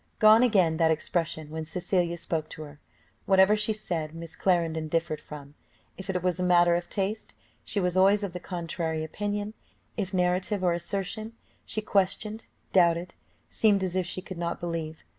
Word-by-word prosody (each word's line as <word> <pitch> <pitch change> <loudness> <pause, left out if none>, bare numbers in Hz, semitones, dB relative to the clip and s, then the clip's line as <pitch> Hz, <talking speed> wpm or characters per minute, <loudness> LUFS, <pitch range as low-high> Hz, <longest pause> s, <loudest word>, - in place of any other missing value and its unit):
Gone 215 +1 +7
again 190 -10 +3
that 165 -1 +4
expression, 160 -1 -1
when 160 0 -4
Cecilia 175 +1 -1
spoke 160 -2 -2
to 155 - -7
her: 145 -1 -12 0.5
whatever 190 +2 +6
she 210 +1 +1
said, 165 -7 -3
Miss 165 -1 -7
Clarendon 165 -4 +1
differed 165 -1 -1
from; 145 -1 -10 0.4
if 190 0 -10
it 180 -2 -1
was 180 0 +1
a - - 0
matter 175 -1 +5
of 175 0 -1
taste, 205 +2 -3 0.3
she 205 - -2
was 180 -1 0
always 195 +2 +4
of 195 -3 -3
the 180 - -5
contrary 165 -3 -3
opinion; 205 +5 -3 0.4
if 195 -3 -2
narrative 185 +2 0
or 175 -1 +3
assertion, 200 +5 -3 0.3
she 215 - -2
questioned, 210 +2 0 0.3
doubted, 175 -1 +3 0.3
seemed 205 -3 +2
as 185 -1 -2
if 185 -1 0
she 185 +1 -4
could 185 -2 -8
not 170 0 -2
believe. 165 -2 -4
180 Hz, 175 wpm, -27 LUFS, 165-195 Hz, 0.5 s, Gone